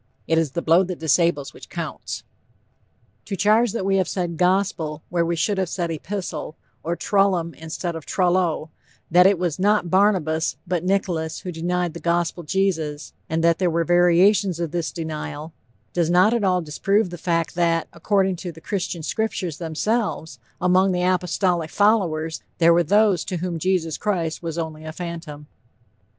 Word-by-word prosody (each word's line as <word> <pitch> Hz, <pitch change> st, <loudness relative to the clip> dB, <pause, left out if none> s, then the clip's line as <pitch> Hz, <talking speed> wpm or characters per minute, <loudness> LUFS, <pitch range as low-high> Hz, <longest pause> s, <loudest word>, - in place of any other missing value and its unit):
It 160 Hz, 0 st, +2 dB
is 155 Hz, -5 st, -1 dB
the 170 Hz, -, -2 dB
blow 165 Hz, +3 st, +5 dB
that 180 Hz, -1 st, -5 dB
disables 160 Hz, -2 st, +1 dB
which -, -, -13 dB
counts. -, -, -5 dB, 1.0 s
To 195 Hz, -, -3 dB
charge 215 Hz, +4 st, +3 dB
that 210 Hz, -5 st, -2 dB
we 195 Hz, 0 st, +2 dB
have 190 Hz, -, +1 dB
said 175 Hz, -3 st, -2 dB
'Gospel,' 180 Hz, -4 st, 0 dB
where 170 Hz, -1 st, +1 dB
we 170 Hz, +1 st, 0 dB
should 190 Hz, +5 st, 0 dB
have 185 Hz, -3 st, -1 dB
said 170 Hz, -2 st, -2 dB
'Epistle,' 165 Hz, -1 st, -5 dB, 0.3 s
or 170 Hz, +2 st, -2 dB
'Trullum' 185 Hz, -4 st, +1 dB
instead 165 Hz, +2 st, -5 dB
of 160 Hz, -4 st, -8 dB
'Trullo'; 175 Hz, -4 st, +1 dB, 0.4 s
that 180 Hz, +2 st, +7 dB
it 195 Hz, -1 st, +3 dB
was 175 Hz, -1 st, -2 dB
not 200 Hz, -3 st, +2 dB
Barnabas, 185 Hz, -5 st, +2 dB
but 175 Hz, -2 st, -1 dB
Nicholas 180 Hz, -4 st, -1 dB
who 180 Hz, -, -5 dB
denied 175 Hz, 0 st, -1 dB
the 170 Hz, -, -7 dB
Gospel 170 Hz, 0 st, 0 dB
Jesus, 160 Hz, -4 st, -1 dB, 0.2 s
and 160 Hz, +1 st, 0 dB
that 170 Hz, -1 st, +3 dB
there 180 Hz, -2 st, +2 dB
were 170 Hz, 0 st, +1 dB
variations 175 Hz, +2 st, +4 dB
of 170 Hz, -3 st, -2 dB
this 170 Hz, -1 st, -2 dB
denial, 160 Hz, -1 st, -6 dB, 0.4 s
does 170 Hz, -2 st, +1 dB
not 180 Hz, +6 st, +5 dB
at 235 Hz, -3 st, 0 dB
all 180 Hz, -2 st, +2 dB
disprove 190 Hz, +6 st, 0 dB
the -, -, -5 dB
fact 165 Hz, -1 st, 0 dB
that, 170 Hz, -1 st, +1 dB
according 190 Hz, +1 st, +1 dB
to 175 Hz, 0 st, -6 dB
the 165 Hz, -, -14 dB
Christian 175 Hz, -2 st, -3 dB
scriptures 185 Hz, -5 st, -2 dB
themselves, 175 Hz, +2 st, -2 dB, 0.2 s
among 185 Hz, +1 st, +3 dB
the 180 Hz, 0 st, 0 dB
apostolic 180 Hz, -2 st, +1 dB
followers 170 Hz, -7 st, +1 dB, 0.2 s
there 170 Hz, -1 st, +5 dB
were 170 Hz, -, +4 dB
those 200 Hz, +1 st, +3 dB
to 180 Hz, -, -3 dB
whom 170 Hz, -1 st, -3 dB
Jesus 170 Hz, -2 st, 0 dB
Christ 175 Hz, -6 st, -1 dB
was 165 Hz, -1 st, -4 dB
only 160 Hz, -2 st, -4 dB
a 155 Hz, -, -6 dB
phantom. 165 Hz, -3 st, -7 dB
175 Hz, 170 wpm, -23 LUFS, 165-190 Hz, 1.0 s, that